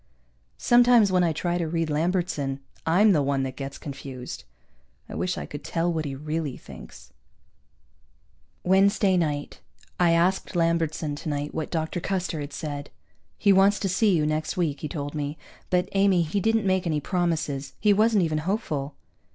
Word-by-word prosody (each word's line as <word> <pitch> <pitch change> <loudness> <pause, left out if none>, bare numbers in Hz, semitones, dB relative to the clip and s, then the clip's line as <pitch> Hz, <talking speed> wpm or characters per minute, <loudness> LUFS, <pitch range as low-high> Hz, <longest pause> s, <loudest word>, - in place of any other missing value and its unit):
Sometimes 240 -4 +5
when 180 -1 +3
I 170 - +2
try 175 +3 -1
to 170 - -1
read 165 -1 -1
Lambertson 155 -4 -1 0.3
I'm 200 +6 +5
the 155 -6 +3
one 140 -1 0
that 130 -1 -4
gets 135 0 -6
confused. 135 - -8 0.6
I - - -9
wish 180 0 -2
I - - -4
could 145 - -8
tell 170 +1 -1
what 160 -1 -2
he 140 -2 -4
really 150 0 -3
thinks. - - -13 1.5
Wednesday 195 +1 +3
night. 150 -4 -2 0.4
I 175 -2 +4
asked 180 +3 +1
Lambertson 165 -3 0
tonight 145 -1 -4
what 160 - -3
Dr. 160 +1 -2
Custer 180 -3 -2
had 145 0 -5
said. 145 0 -5 0.5
"He 200 -1 +4
wants 195 +2 +4
to 195 - -1
see 195 +1 +3
you 150 - +1
next 155 +2 -2
week," 155 -6 0
he 150 - -3
told 145 -3 -5
me. 150 0 -3 0.3
"But 180 0 +1
Amy, 195 -3 +3
he 165 +6 -1
didn't 225 +1 +1
make 185 -1 +1
any 155 -2 0
promises. 155 -5 -2
He 210 -1 +4
wasn't 215 -1 +3
even 155 -2 0
hopeful." 155 - -2
165 Hz, 170 wpm, -25 LUFS, 145-185 Hz, 1.5 s, Sometimes